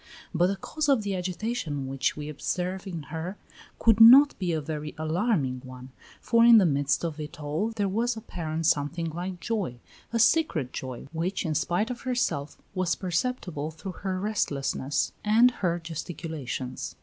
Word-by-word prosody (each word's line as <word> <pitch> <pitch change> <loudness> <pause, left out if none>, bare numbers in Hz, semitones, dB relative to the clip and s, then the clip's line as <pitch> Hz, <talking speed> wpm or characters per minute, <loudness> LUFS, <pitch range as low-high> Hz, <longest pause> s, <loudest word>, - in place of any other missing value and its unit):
But 175 +1 +3
the 195 - 0
cause 300 +8 -3
of 265 -6 +4
the 200 -1 -2
agitation 180 - -3
which 135 +2 -1
we 150 0 -5
observe 180 +6 -3
in 170 -5 -5
her 170 +5 -4 0.4
could 225 -2 +4
not 270 +6 +10
be 180 -3 -1
a 160 - 0
very 150 0 -5
alarming 155 - 0
one, 130 0 -10 0.3
for 230 -1 +3
in 235 -1 +9
the 200 - +6
midst 145 0 +1
of 160 -2 -4
it 150 +2 -7
all 155 +9 -1
there 210 -3 -1
was 230 +4 0
apparent 165 -7 -4
something 160 +3 +1
like 175 +2 -5
joy, 190 - -3 0.3
a 230 - 0
secret 230 - +2
joy 130 -2 -6
which 175 +4 -2
in 160 - 0
spite 175 - 0
of 245 - -6
herself 240 - -1 0.2
was 185 -3 0
perceptible 180 - -2
through 160 +4 -7
her 190 -1 -2
restlessness 145 -9 -1
and 230 +4 +5
her 175 -3 +1
gesticulations. 160 -6 -5
175 Hz, 165 wpm, -27 LUFS, 150-210 Hz, 0.4 s, not